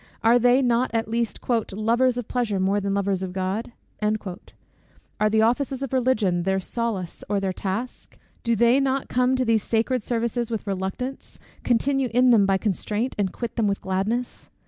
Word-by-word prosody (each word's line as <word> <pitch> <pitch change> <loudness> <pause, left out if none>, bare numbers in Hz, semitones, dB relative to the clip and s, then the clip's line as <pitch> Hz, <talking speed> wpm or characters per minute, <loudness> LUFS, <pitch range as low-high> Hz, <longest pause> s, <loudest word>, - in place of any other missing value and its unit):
Are 235 +2 +5
they 245 +3 +4
not 245 +1 +2
at 225 -1 0
least 230 0 -2
"lovers 235 +2 +1
of 245 -3 -4
pleasure 230 -6 -1
more 195 +2 +1
than 200 0 -1
lovers 200 -1 0
of 185 -1 -4
God?" 190 +5 -2 0.3
Are 210 0 -4
the 220 +1 +3
offices 265 +3 0
of 270 - -5
Religion 220 -9 +2
their 190 +2 0
solace 200 -3 -4
or 205 -1 +1
their 190 -1 -1
task? 205 +7 -5 0.2
Do 235 -1 +1
they 235 +4 +4
not 270 0 0
come 250 +1 +2
to 255 0 0
these 225 -2 +3
sacred 230 +4 0
services 235 +1 -1
with 225 -2 -3
reluctance, 195 +7 -4 0.3
continue 265 +2 +1
in 250 0 +5
them 205 -4 +5
by 195 -1 +3
constraint, 210 +4 -2
and 195 -3 +1
quit 235 0 -6
them 225 -3 +2
with 200 0 0
gladness? 205 +6 -2
225 Hz, 175 wpm, -24 LUFS, 200-245 Hz, 0.3 s, Are